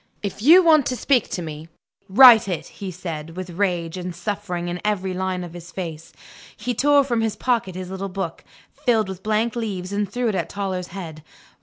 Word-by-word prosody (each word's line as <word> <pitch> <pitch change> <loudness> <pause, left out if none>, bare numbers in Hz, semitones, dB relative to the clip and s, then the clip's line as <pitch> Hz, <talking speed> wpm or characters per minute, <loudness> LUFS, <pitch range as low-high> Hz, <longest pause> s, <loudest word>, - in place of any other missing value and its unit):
"If 200 0 -4
you 335 +10 +8
want 310 -5 +5
to 255 - -1
speak 250 -2 +1
to 180 - -4
me, 155 0 -7 0.4
write 235 +1 +8
it!" 180 -5 -3
he 195 - -8
said, 165 -2 -7
with 185 -1 -5
rage 175 -2 -1
and 180 -1 -5
suffering 190 -3 -4
in 175 0 -4
every 190 -3 -1
line 185 0 -2
of 175 -1 -9
his 175 0 -10
face. 165 -4 -6 0.5
He 245 +4 -2
tore 285 +4 +4
from 240 -4 0
his 220 -1 -1
pocket 230 -7 -1
his 185 0 -6
little 195 +1 -4
book, 180 -3 -5 0.3
filled 225 -5 +1
with 190 -1 -7
blank 215 +3 0
leaves, 200 -5 -4
and 200 -1 -1
threw 245 +1 -1
it - - -1
at 190 - -2
Toller's 190 -3 -3
head. 165 -5 -8
190 Hz, 200 wpm, -22 LUFS, 175-220 Hz, 0.5 s, you